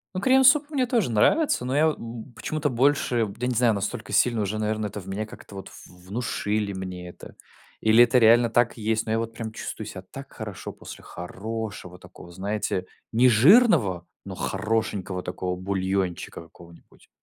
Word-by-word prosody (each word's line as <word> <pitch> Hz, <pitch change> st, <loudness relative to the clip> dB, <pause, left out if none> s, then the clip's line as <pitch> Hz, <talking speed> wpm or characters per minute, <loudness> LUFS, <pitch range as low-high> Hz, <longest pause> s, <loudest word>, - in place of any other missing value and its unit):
Ну, 185 Hz, -, -2 dB
крем-суп 270 Hz, +5 st, +5 dB
мне 260 Hz, -4 st, 0 dB
тоже 230 Hz, -, +1 dB
нравится, 125 Hz, -, +2 dB
но 130 Hz, -, -1 dB
я 155 Hz, +2 st, +5 dB
во 155 Hz, -, +1 dB
м, 115 Hz, +1 st, -9 dB
почему-то 150 Hz, +5 st, -2 dB
больше, 125 Hz, -2 st, +2 dB
я 125 Hz, -, -2 dB
не 125 Hz, -, 0 dB
знаю, 120 Hz, -1 st, +3 dB
настолько 105 Hz, +2 st, -4 dB
сильно 120 Hz, -3 st, +2 dB
уже, 105 Hz, +1 st, -2 dB
наверное, 110 Hz, 0 st, -1 dB
это 105 Hz, -, -7 dB
в 95 Hz, -, -12 dB
меня 100 Hz, +3 st, -3 dB
как-то 105 Hz, -, -13 dB
вот 95 Hz, -, -8 dB
в 90 Hz, 0 st, -16 dB
внушили 105 Hz, -1 st, -2 dB
мне 90 Hz, -2 st, -6 dB
это. -, -, -13 dB, 0.4 s
Или 110 Hz, +2 st, +6 dB
это 120 Hz, +1 st, +3 dB
реально 115 Hz, 0 st, +5 dB
так 120 Hz, +1 st, +2 dB
есть, 110 Hz, 0 st, -1 dB
но 110 Hz, -, -3 dB
я 110 Hz, -, +1 dB
вот 115 Hz, 0 st, -4 dB
прям 115 Hz, -1 st, -6 dB
чувствую 110 Hz, -, -6 dB
себя 100 Hz, -3 st, -8 dB
так 135 Hz, +9 st, -11 dB
хорошо 105 Hz, -5 st, -7 dB
после -, -, -11 dB
хорошего 100 Hz, -1 st, -7 dB
такого, 90 Hz, 0 st, -14 dB
знаете, 95 Hz, 0 st, -3 dB, 0.2 s
нежирного, 125 Hz, -, +5 dB, 0.2 s
но -, -, -7 dB
хорошенького 100 Hz, -4 st, -2 dB
такого 90 Hz, 0 st, -3 dB
бульончика 95 Hz, -2 st, -2 dB
какого-нибудь. 85 Hz, +1 st, -18 dB
110 Hz, 175 wpm, -25 LUFS, 95-125 Hz, 0.4 s, Или